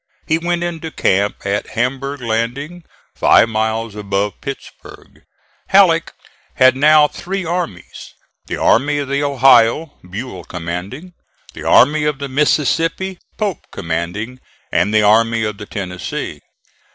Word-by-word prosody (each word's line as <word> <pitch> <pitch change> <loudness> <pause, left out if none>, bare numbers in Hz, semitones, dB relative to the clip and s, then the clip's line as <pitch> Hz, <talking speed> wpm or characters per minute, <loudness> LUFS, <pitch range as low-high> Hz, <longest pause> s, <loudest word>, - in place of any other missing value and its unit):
He 160 +1 +1
went 175 +1 -1
into 165 -2 -4
camp 100 -9 0
at 100 +1 -1
Hamburg 135 +3 -2
landing 125 +9 -3 0.3
five 115 - +4
miles 110 0 -1
above 100 -1 -3
Pittsburg. 140 -2 -10 0.5
Halleck - - +4 0.4
had 130 0 +5
now 150 +2 +5
three 190 +4 -5
armies: 170 - -5 0.3
the - - -3
Army 145 +5 +2
of 140 -2 -3
the 140 +1 0
Ohio, 135 +1 +3
Buell 95 -2 -6
commanding; 90 - -6 0.4
the - - -9
Army 150 +4 +4
of 150 -2 0
the 140 0 -5
Mississippi, 160 +6 0 0.2
Pope 205 -6 -3
commanding; 90 +10 -4 0.3
and 90 +5 +1
the 110 0 +3
Army 115 +2 +3
of 105 -1 -3
the 105 - -8
Tennessee. 90 -3 -5
130 Hz, 125 wpm, -17 LUFS, 105-150 Hz, 0.5 s, had